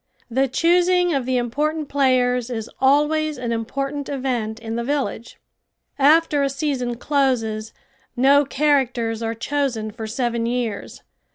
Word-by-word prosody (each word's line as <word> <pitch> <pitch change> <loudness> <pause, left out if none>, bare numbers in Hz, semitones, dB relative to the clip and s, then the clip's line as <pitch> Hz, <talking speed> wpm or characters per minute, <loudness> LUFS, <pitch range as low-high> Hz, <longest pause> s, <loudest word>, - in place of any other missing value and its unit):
The 265 +3 +2
choosing 355 +5 +3
of 265 -3 -1
the 260 -1 +1
important 295 +6 -1
players 250 -3 +1
is 225 -2 -5
always 300 +2 +2
an 245 -2 -3
important 275 +5 -3
event 245 -5 -2
in 225 0 -5
the 235 - -2
village. 270 -3 -3 0.6
After 295 +1 +4
a 275 - +1
season 270 -4 -2
closes 235 -6 0 0.5
no 280 +3 +5
characters 260 -6 0
are 225 0 -2
chosen 235 -3 -2
for 220 0 -7
seven 235 0 -1
years. 235 -4 -3
260 Hz, 130 wpm, -21 LUFS, 235-285 Hz, 0.6 s, no